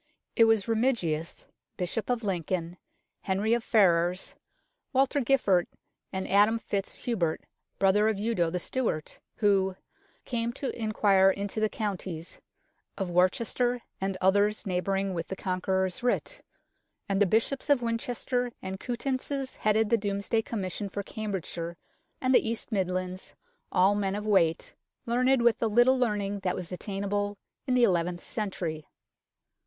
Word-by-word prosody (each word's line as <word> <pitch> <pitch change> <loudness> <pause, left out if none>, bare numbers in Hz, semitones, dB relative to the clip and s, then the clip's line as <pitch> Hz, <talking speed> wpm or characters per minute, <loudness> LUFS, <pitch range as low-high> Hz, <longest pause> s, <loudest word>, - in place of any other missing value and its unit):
It 230 - +6
was 225 -3 +3
Remigius, 220 -9 0 0.3
Bishop 185 +6 -2
of 245 -2 0
Lincoln, 175 -2 -2 0.4
Henry 200 +4 +1
of 235 -1 +1
Ferrars, 180 -5 +2 0.6
Walter 270 +2 +3
Giffard, 230 -9 +3 0.4
and 190 -1 -3
Adam 205 +3 +4
fitz 200 -3 -4
Hubert, 185 -10 0 0.4
brother 205 +2 +4
of 215 - -1
Eudo 205 -5 +1
the 180 +2 -2
Steward, 200 -7 -2 0.2
who 195 -3 +2 0.3
" - - -35
came 235 -1 0
to 275 +1 -4
inquire 205 -4 +3
into 200 +2 -2
the 215 0 +2
counties 185 -7 -4 0.3
" - - -47
of 190 -3 -2
Worcester 230 +7 +1 0.2
and 195 -1 -1
others 205 +3 +2
neighbouring 195 +1 -1
with 165 -2 -3
the 190 - -4
Conqueror's 190 +3 -1
writ; 250 - -1 0.7
and 195 0 0
the 205 - +5
Bishops 230 - 0
of 280 -4 +4
Winchester 245 +1 -1
and 190 0 -6
Coutances 260 +2 -3
headed 215 0 +2
the 230 - +4
Domesday 200 +2 0
Commission 200 -2 -4
for 200 +1 -4
Cambridgeshire 180 -5 -5 0.4
and 255 0 +1
the 225 - +4
East 230 +1 -4
Midlands 185 -2 -2 0.4
all 190 +2 +4
men 200 -1 -1
of 210 +1 -4
weight, 170 -6 +2 0.3
learned 250 +1 +2
with 235 -1 +4
the 225 - +1
little 240 +4 +5
learning 205 -5 0
that 185 -2 -1
was 180 -1 -5
attainable 205 +2 -2 0.3
in 255 - +2
the 250 - +4
eleventh 175 -4 +1
century. 175 -8 -4
205 Hz, 145 wpm, -28 LUFS, 185-230 Hz, 0.7 s, It